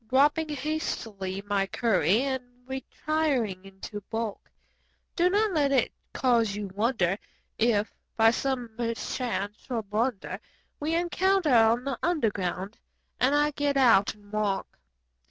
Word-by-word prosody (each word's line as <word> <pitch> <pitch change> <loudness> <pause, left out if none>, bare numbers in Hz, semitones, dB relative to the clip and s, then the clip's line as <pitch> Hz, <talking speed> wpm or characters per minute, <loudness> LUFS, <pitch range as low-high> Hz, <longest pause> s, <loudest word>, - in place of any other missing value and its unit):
Dropping 295 +4 +3
hastily 225 -10 -3
my 200 -1 +1
curry 205 - +2
and 265 -2 -1 0.2
retiring 265 -6 -1
into 195 +2 -8
balk; 225 -2 -4 0.7
Do 355 +1 +4
not 420 +2 +2
let 290 -5 +2
it 260 -4 +3 0.2
cause 230 -5 +2
you 205 -1 -4
wonder 205 -3 +1 0.4
if, 220 -2 +2 0.2
by 225 0 +6
some 250 -1 -2
mischance 230 -3 -3
or 235 -3 -1
blunder. 210 +2 -2 0.4
We 310 +3 -1
encounter 350 -2 +2
on 230 +1 +5
the 275 -2 -3
Underground 205 - -1 0.4
and 265 +3 +3
I 295 0 +3
get 285 -1 0
out 230 -8 +5
and 205 -1 -20
walk. 210 - -2
235 Hz, 125 wpm, -28 LUFS, 205-285 Hz, 0.7 s, by